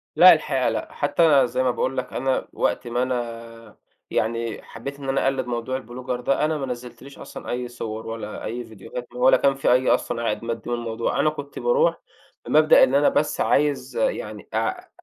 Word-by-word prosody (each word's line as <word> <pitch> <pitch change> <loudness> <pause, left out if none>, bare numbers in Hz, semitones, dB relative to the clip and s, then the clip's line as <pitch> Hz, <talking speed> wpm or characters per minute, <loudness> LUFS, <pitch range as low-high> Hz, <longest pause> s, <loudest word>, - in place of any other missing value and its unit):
لأ - - +10
الحقيقة - - 0
لأ، - - -4
حتى 150 -6 +3
زي 130 - -1
ما 130 - +2
باقول 130 +2 -2
لك 130 - -4
أنا 130 -1 -1
وقت - - -1
ما 120 +1 0
أنا 115 -3 -5 0.3
يعني 115 0 -1
حبيّت 140 +5 -8
إن 135 - -5
أنا 135 - +1
أقلّد 135 -1 0
موضوع 120 +2 -2
الBlogger 125 +1 -5
ده 140 +4 +1
أنا 155 0 0
ما 140 - -3
نزّلتليش 125 +2 -8
أصلًا - - -9
أي 125 0 -2
صور 110 -2 -6
ولا 110 -2 -6
أي 120 +3 -4
فيديوهات 115 +3 -8
ولا 125 +1 +5
كان 135 -1 +2
في 135 - +1
أي 125 +1 +3
أصلًا 115 0 0
عائد 115 0 -1
مادّي 115 +1 -4
من 120 - 0
الموضوع. 115 -1 -2
أنا 155 - +4
كنت 145 -2 -7
باروح 485 0 +2 0.4
بمبدأ - - +6
إن - - +3
أنا - - +5
بس - - 0
عايز 150 - +1
يعني - - -2
أع 365 0 -2
125 Hz, 190 wpm, -23 LUFS, 115-140 Hz, 0.4 s, لأ